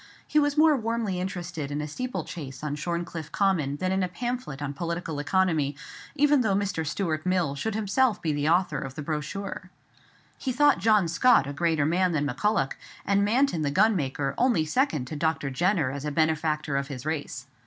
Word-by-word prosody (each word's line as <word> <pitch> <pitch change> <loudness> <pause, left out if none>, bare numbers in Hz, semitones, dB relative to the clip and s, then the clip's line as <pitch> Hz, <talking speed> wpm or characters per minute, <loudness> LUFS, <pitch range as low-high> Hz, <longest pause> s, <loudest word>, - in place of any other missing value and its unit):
He 305 - +3
was 290 0 +1
more 310 0 +6
warmly 230 -6 -2
interested 175 -5 -4
in 145 +1 -3
a 150 - -3
steeplechase 160 - -5
on 150 -1 -2
Shorncliffe 170 0 -4
Common 180 -9 +1
than 185 +4 -1
in 190 0 +1
a 185 - +1
pamphlet 240 - -4
on 145 -1 -3
political 170 0 -4
economy, 155 -3 +1 0.4
even 295 -1 +4
though 210 -5 +1
Mr. 195 -4 -1
Stuart 155 -1 -2
Mill 180 -6 +1
should 210 +9 -3
himself 220 +2 +1
be 155 -2 -1
the 145 +1 0
author 180 +3 +2
of 135 0 -6
the 150 - -5
brochure. 165 +6 -4 0.7
He 265 - -2
thought 290 -3 +4
John 210 -2 +4
Scott 170 - +4
a 140 - -5
greater 160 -1 +1
man 175 +3 +2
than 145 -2 0
Maculloch; 145 - 0 0.3
and 200 0 +2
Manton 230 - +2
the 145 - 0
gunmaker 145 -7 +1
only 235 -11 +3
second 155 - 0
to 155 - -6
Dr. 150 -2 -1
Jenner 170 -1 +1
as 140 0 -6
a 150 - -2
benefactor 155 -1 0
of 140 0 -2
his 135 -2 -7
race. 145 -5 -4
170 Hz, 185 wpm, -26 LUFS, 150-205 Hz, 0.7 s, more